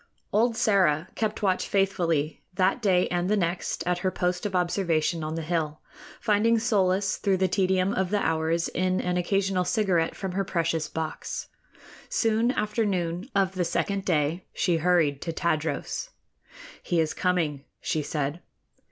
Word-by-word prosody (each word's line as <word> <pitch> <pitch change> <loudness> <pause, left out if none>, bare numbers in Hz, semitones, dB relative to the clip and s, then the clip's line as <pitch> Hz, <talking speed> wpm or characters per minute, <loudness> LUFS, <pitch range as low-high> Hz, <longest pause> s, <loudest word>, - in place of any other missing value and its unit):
Old 230 +2 +3
Sĕra 185 -8 +2
kept 215 -1 -2
watch 185 -2 +1
faithfully 170 -6 0
that 190 +5 +2
day 185 -4 +3
and 175 +1 0
the 210 - +3
next 175 -1 -1
at 180 0 0
her 185 - +1
post 180 +1 -1
of 190 - -5
observation 170 -3 +1
on 155 +1 -3
the 165 - -3
hill, 155 -2 -1 0.4
finding 225 +1 +3
solace 195 -3 +1
through 195 -2 +1
the 190 0 +2
tedium 185 +1 +1
of 190 -1 0
the 205 +1 +1
hours 160 +1 +1
in 185 0 0
an 180 0 -1
occasional 190 +1 +1
cigarette 180 -4 +1
from 190 -2 -4
her 195 +2 0
precious 165 -4 -1
box. 160 0 -5 0.6
Soon 225 +1 +2
after 215 -2 0
noon 180 +1 -2
of 195 -1 +2
the 185 -1 0
second 195 +3 -1
day 160 0 0
she 175 -1 +2
hurried 160 -4 +2
to 170 - -3
Tadros. 160 -3 -2 0.7
"He 175 - 0
is 160 -1 +1
coming," 160 -6 0
she 155 - -1
said. 150 +2 -3
180 Hz, 160 wpm, -26 LUFS, 165-195 Hz, 0.7 s, Old